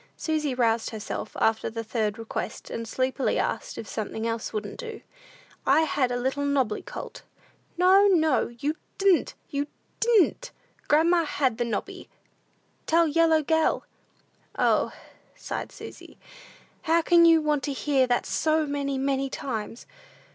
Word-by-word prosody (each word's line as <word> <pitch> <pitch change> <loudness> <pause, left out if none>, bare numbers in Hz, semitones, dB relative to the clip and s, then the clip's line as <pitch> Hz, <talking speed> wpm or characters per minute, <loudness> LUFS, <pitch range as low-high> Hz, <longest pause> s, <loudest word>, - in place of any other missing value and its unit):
Susy 305 -4 -1
roused 230 -2 +1
herself 215 -1 -6
after 220 0 +1
the 230 0 -5
third 220 -1 -2
request, 225 0 -6
and 230 0 -4
sleepily 260 +3 0
asked - - -2
if 220 - -6
something 220 +1 -4
else 230 -1 -2
wouldn't 215 - -5
do? 460 -2 -7 0.6
"I 285 +4 +4
had 280 -5 +1
a 245 - 0
little 265 +3 -1
nobby 270 -6 0
colt." - - -8 0.6
"No, 380 +3 +6
no, 320 -8 +3
you 280 +7 -3 0.2
di'n't, 390 -3 +3 0.2
you 285 0 -1 0.3
di'n't; 470 +2 +3 0.4
grandma 335 +3 +4
had 260 -5 0
the 240 - +1
nobby! 235 - -5 0.8
Tell 335 +1 +4
yellow 320 0 +3
gell." 320 +2 +1 0.7
"O," - - +2 0.4
sighed - - -5
Susy, - - -11 0.6
"how 330 +1 +2
can 340 0 +5
you 330 -1 +7
want 300 -2 0
to 290 - -2
hear 270 -1 +1
that 245 -1 +1
so 315 0 +1
many, 280 -1 -2
many 270 0 0
times? 230 -4 -5
280 Hz, 140 wpm, -26 LUFS, 235-320 Hz, 0.8 s, you